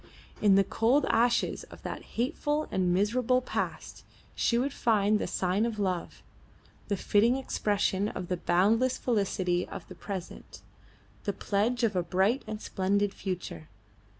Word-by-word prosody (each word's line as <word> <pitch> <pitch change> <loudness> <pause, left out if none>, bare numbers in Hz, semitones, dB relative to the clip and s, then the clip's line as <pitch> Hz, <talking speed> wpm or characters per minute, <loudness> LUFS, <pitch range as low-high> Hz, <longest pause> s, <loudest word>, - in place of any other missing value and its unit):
In 205 -2 +5
the 195 - +5
cold 240 +8 +2
ashes 240 +1 +2
of - - -14
that - - -5 0.2
hateful 295 +4 0
and 180 -2 +1
miserable 230 +7 +2
past 255 - -4 0.3
she 235 - +1
would 265 +3 0
find 215 -4 +2
the - - -2
sign 185 +3 0
of 230 -2 -1
love, 185 -4 -2 0.6
the 200 - -1
fitting 220 +6 +3
expression 205 -6 0
of 185 -4 -5
the 180 - -1
boundless 220 +10 +2
felicity 190 -6 0
of - - -8
the - - -8
present, 190 -3 -7 0.6
the 200 - 0
pledge 220 +6 0
of 215 -4 +2
a 180 - +2
bright 190 +9 +1
and 215 -1 -4
splendid 200 +1 0
future. 180 -4 -5
205 Hz, 150 wpm, -29 LUFS, 190-235 Hz, 0.6 s, In